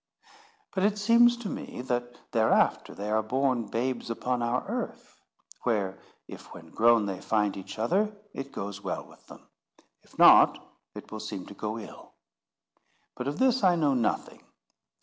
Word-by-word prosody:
But 190 - -1
it 210 +1 +2
seems 235 +3 +5
to 235 -3 -6
me, 125 - -6
that 120 -1 -4
thereafter 110 -1 +2
they 105 +1 -4
are 110 0 +2
born 125 0 0
babes 120 +3 -2
upon 125 +2 -2
our 120 +2 -1
earth: - - -6 0.4
where, 100 -5 -1 0.3
if, - - -11
when - - -13
grown, 115 -1 +4
they 95 -2 -4
find 105 -2 0
each 95 +1 -8
other, 190 - +1 0.2
it 135 0 -6
goes 100 0 -6
well 95 - -4
with - - -20
them; - - -14 0.5
if - - -23
not, - - +7 0.4
it - - -10
will 110 - -6
seem 105 -3 -6
to - - -11
go 105 +2 -4
ill. 110 - -11 1.0
But 125 - -5
of 145 - -3
this 260 -3 +2
I 180 -2 +5
know 150 -4 +2
nothing. 120 -3 -2
120 Hz, 165 wpm, -28 LUFS, 110-140 Hz, 1.0 s, not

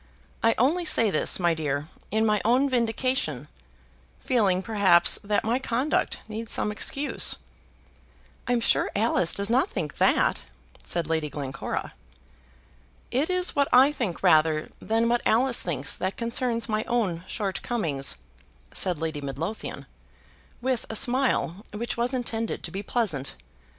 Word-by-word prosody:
I 225 0 +3
only 310 +9 +2
say 230 -9 +3
this, - - +2
my 175 -2 +3
dear, 150 -2 -2 0.2
in 220 +2 +1
my 210 -2 +2
own 250 +5 +3
vindication, 235 - 0 0.7
feeling, 200 -7 +1
perhaps, 190 -6 +4
that 205 0 0
my 235 +3 +1
conduct 265 +3 0
needs 220 +1 -6
some 210 - +1
excuse." 275 +7 0 1.1
"I'm 245 -1 +1
sure - - +3
Alice 200 -5 +2
does 200 +2 +1
not 255 +3 +3
think 150 -3 -5
that," - - +3 0.4
said 170 -3 -2
Lady 160 -2 -1
Glencora. 140 -2 -5 1.2
"It 275 +7 0
is 365 0 0
what 280 -1 +3
I 260 +3 +7
think 240 - -4
rather 155 0 +3
than 225 +1 +1
what 240 0 +2
Alice 245 +2 +3
thinks 145 -5 -1
that 190 +1 -3
concerns 235 -1 -1
my 215 0 -1
own 205 -9 -1
shortcomings," 190 - -2 0.6
said 180 -5 +1
Lady 160 -2 -3
Midlothian, 150 +10 -5 0.8
with 255 -2 0
a 220 - -5
smile 245 -8 +1 0.2
which 235 +3 -3
was 240 +1 -1
intended 230 -3 -3
to - - -3
be 195 - -4
pleasant. 195 - -2
220 Hz, 140 wpm, -26 LUFS, 170-245 Hz, 1.2 s, I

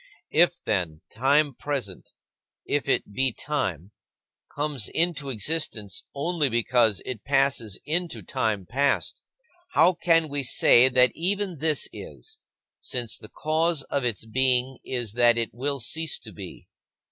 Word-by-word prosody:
If, - - +4
then, 80 -3 -1
time 140 +5 +2
present 125 -9 -4 0.6
if - - -1
it 105 - 0
be 130 +3 +2
time 95 - -3 0.6
comes 145 -5 -1
into 165 -4 0
existence 115 - -2
only 150 0 0
because 120 -2 +2
it 120 -5 -6
passes 135 -7 +1
into 155 - -2
time 105 +1 -1
past, 140 +8 0 0.5
how 180 - +5
can 165 -2 +2
we 145 -1 -1
say 130 -1 +5
that 125 0 +4
even 190 -1 -2
this 155 -1 +1
is, 440 0 -10 0.4
since 120 -3 -3
the 110 - -11
cause 160 -1 0
of 140 - 0
its 115 -3 -2
being 130 +2 +2
is 120 -5 -3
that 120 0 +4
it 115 -1 -2
will 140 +4 -2
cease 160 +7 -1
to 110 - -11
be? - - -10
130 Hz, 135 wpm, -25 LUFS, 115-150 Hz, 0.6 s, how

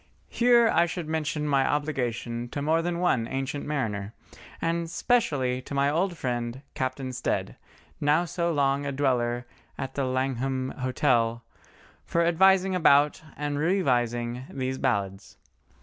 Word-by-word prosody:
Here 240 -1 +5
I 170 -5 +3
would 170 -3 -4
mention 155 -1 -2
my 140 -2 +3
obligation 120 -5 -2
to 140 - -4
more 160 +2 +2
than 170 0 -2
one 130 -10 +1
ancient 135 +3 -3
mariner, 110 -8 -2 0.5
and 165 0 -1
specially 140 - +1
to 140 - -7
my 140 +1 +2
old 175 +3 0
friend, 120 0 -3
Captain 130 0 -3
Stead, 125 - -2 0.4
now 150 +4 +3
so 170 0 -1
long 140 -2 +1
a 140 - -2
dweller 120 -3 0 0.3
at 135 0 -5
the 140 - -1
Langham 130 0 -1
Hotel, 120 -2 +1 0.6
for 170 0 +1
advising 190 +2 +4
about, 150 -4 +4 0.2
and 145 0 -2
revising, 125 - 0
these 130 0 -3
ballads. 100 -6 -2
140 Hz, 135 wpm, -27 LUFS, 125-160 Hz, 0.6 s, Here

